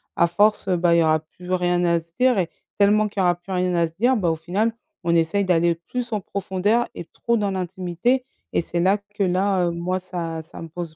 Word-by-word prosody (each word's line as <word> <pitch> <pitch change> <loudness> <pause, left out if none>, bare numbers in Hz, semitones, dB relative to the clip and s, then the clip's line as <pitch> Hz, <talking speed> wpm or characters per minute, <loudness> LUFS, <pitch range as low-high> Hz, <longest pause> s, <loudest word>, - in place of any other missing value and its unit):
à 170 - +4
force, 205 +4 +2
heu, 180 - +2
bah, 170 0 +3
il - - +5
y - - +4
aura 155 0 +3
plus 180 +3 -12
rien 180 -1 +1
à 170 -1 +3
se 165 0 -19
dire 250 -2 +4
et 175 -3 0 0.3
tellement 210 +1 +4
qu'il 205 -1 -6
y - - +3
aura 175 -1 +3
plus 175 +3 -12
rien 180 -1 0
à 170 -1 +2
se 160 - -16
dire, 250 +4 +4
bah, 185 -7 +1
au - - 0
final, 185 +8 0 0.3
on 170 -1 +1
essaye 170 +5 +2
d'aller 170 -2 +3
plus 240 +9 -5
en 210 - -1
profondeur 200 +5 0
et - - -6
trop 235 +7 -1
dans 205 -2 0
l'intimité 185 +7 -1 0.3
et - - +2
c'est 170 +1 -3
là 190 +4 +3
que 205 0 -5
là, 185 0 +2
heu, - - 0
moi, 175 +2 -2
ça 170 -3 -5
ça 160 - -12
me 165 - -6
pose 165 -1 -7
180 Hz, 250 wpm, -23 LUFS, 170-205 Hz, 0.3 s, il